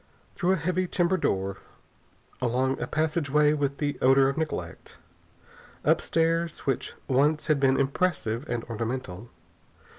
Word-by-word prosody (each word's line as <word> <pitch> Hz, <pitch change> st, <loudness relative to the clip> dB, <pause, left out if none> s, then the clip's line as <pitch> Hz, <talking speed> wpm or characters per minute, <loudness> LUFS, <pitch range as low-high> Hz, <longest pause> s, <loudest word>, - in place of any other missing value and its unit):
Through 185 Hz, +1 st, +1 dB
a -, -, +3 dB
heavy 185 Hz, +2 st, -1 dB
timber 175 Hz, +1 st, +1 dB
door. 95 Hz, -, -1 dB, 0.8 s
Along 130 Hz, +2 st, 0 dB
a 125 Hz, -, -2 dB
passageway 150 Hz, -1 st, +2 dB
with 140 Hz, -2 st, -1 dB
the 145 Hz, -1 st, -2 dB
odor 135 Hz, +1 st, +5 dB
of 140 Hz, -, -3 dB
neglect. 160 Hz, -1 st, -5 dB, 0.9 s
Up -, -, +4 dB
stairs 165 Hz, 0 st, 0 dB
which 135 Hz, -3 st, -2 dB
once 145 Hz, +4 st, +2 dB
had 155 Hz, -2 st, +2 dB
been 135 Hz, -1 st, +3 dB
impressive 135 Hz, -4 st, 0 dB
and 120 Hz, -1 st, -2 dB
ornamental. 115 Hz, -2 st, -5 dB
140 Hz, 130 wpm, -27 LUFS, 125-160 Hz, 0.9 s, odor